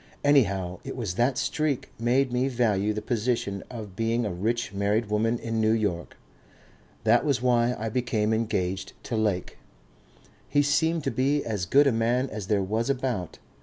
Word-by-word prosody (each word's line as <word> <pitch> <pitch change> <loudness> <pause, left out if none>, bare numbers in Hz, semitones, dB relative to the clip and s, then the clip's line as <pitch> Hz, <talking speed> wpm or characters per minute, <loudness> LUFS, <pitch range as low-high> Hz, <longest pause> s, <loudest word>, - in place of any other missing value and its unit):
Anyhow 100 -11 +2
it - - -6
was 110 -8 -3
that 120 +6 +1
streak 140 +1 -1
made 125 +2 +2
me 125 +2 +1
value 110 -5 +1
the 105 0 -4
position 110 -4 -1
of 105 -6 -8
being 115 +2 0
a 100 - -2
rich 115 +6 -2
married 105 +2 0
woman 115 +3 +1
in 115 -1 -2
New 110 0 +3
York. 100 -7 -2 0.9
That 115 +2 +4
was 140 -5 +1
why 120 -1 +3
I 110 - -3
became 110 -2 0
engaged 95 -4 -1
to 120 - -3
Lake. 105 -5 -1 0.9
He 145 - +3
seemed 160 +3 +1
to 135 - -1
be 135 +5 +1
as 105 -6 -2
good 145 +8 +5
a 140 - +4
man 120 +3 0
as 105 -3 -5
there 100 -2 +2
was 110 +6 -1
about. 125 - -2
115 Hz, 170 wpm, -26 LUFS, 105-125 Hz, 0.9 s, good